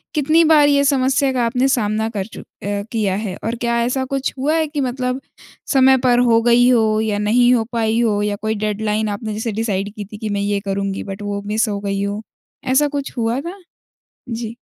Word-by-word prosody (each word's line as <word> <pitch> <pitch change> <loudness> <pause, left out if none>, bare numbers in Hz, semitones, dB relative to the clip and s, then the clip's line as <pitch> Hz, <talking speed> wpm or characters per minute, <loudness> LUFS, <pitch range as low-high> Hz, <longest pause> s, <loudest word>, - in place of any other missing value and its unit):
कितनी 310 +3 +4
बार 300 -2 +6
ये 280 -1 +3
समस्या 270 0 +2
का 245 -2 0
आपने 250 +3 +1
सामना 220 -3 0
कर 200 -4 -4
चुक 225 - -11 0.2
अ, 200 0 -2
किया 205 -5 0
है? 200 -3 -4
और 230 +2 -2
क्या 235 0 +1
ऐसा 260 +2 0
कुछ 275 +1 -2
हुआ 295 +5 +1
है 320 -1 +1
कि 290 -1 -3
मतलब 255 0 -2 0.5
समय 265 0 +6
पर 245 -1 +4
हो 230 0 +4
गई 240 +1 +4
हो 220 -3 +3
या 215 -2 -1
नहीं 240 +4 +4
हो 230 - +2
पाई 225 -1 0
हो 210 -3 +1
या 205 0 -1
कोई 220 +1 -1
डेडलाइन 215 +1 -1
आपने 210 +1 -4
जैसे 220 +1 -3
डिसाइड 205 -2 -2
की 210 -2 -7
थी 210 +1 -10
कि 215 0 -4
मैं 200 0 -1
ये 200 0 0
करुँगी 195 0 -2
बट 195 +1 -7
वो 205 0 -3
मिस 220 +2 0
हो 200 -1 -2
गई 200 -1 -2
हो? 205 +1 -3 0.4
ऐसा 265 +3 +3
कुछ 280 -2 -5
हुआ 230 +3 0
था? 350 +6 -7 0.7
जी। 230 -1 -5
225 Hz, 215 wpm, -19 LUFS, 210-260 Hz, 0.7 s, बार